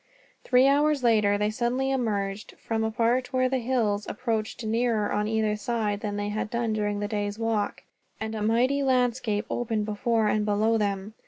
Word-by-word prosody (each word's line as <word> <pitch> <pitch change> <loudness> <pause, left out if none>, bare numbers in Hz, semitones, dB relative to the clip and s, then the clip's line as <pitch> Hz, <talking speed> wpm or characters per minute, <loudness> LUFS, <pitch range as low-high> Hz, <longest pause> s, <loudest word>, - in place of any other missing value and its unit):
Three 250 0 +4
hours 290 0 +3
later 210 -4 +3
they 210 +1 0
suddenly 250 +4 -1
emerged, 210 -5 -2
from 225 -1 -2
a 220 - 0
part 240 +3 0
where 255 0 +2
the 260 0 0
hills 225 -5 0
approached 225 -1 -3
nearer 225 -1 0
on 210 0 0
either 220 -1 +1
side 210 -1 -2
than 205 -1 -4
they 205 0 -2
had 215 +1 -3
done 235 -1 -1
during 205 -1 -1
the 205 - -1
day's 205 -1 -3
walk, 225 -2 -1 0.4
and 220 0 -4
a 215 - -4
mighty 245 +6 +2
landscape 245 -5 +1
opened 220 -3 -1
before 220 +1 0
and 210 0 +1
below 215 +2 +2
them. 200 0 -2
220 Hz, 180 wpm, -26 LUFS, 210-240 Hz, 0.4 s, Three